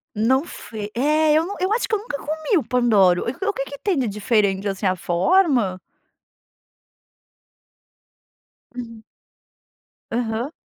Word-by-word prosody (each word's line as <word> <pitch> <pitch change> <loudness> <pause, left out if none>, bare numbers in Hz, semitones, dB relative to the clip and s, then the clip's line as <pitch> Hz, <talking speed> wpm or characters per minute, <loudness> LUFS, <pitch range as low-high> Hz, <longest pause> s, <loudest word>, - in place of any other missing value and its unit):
Não 255 +7 +2
fe 215 -10 -8
é 300 +5 +3
eu 320 +2 +3
não 400 - -5
eu 375 +3 +1
acho 465 - +1
que - - +1
eu - - +1
nunca 405 -8 -5
comi 315 +6 -1
o 300 - -3
Pandoro. 220 -7 +3
O 385 +12 -2
que 275 - -3
que 280 +1 -9
tem 390 -7 0
de 255 -4 0
diferente 205 -1 0
assim, 195 +1 -3
a 185 0 +2
forma? 210 - +2 3.0
Hum. 230 -3 -8 1.1
Aham. 235 +2 -2
245 Hz, 135 wpm, -22 LUFS, 210-315 Hz, 3.0 s, é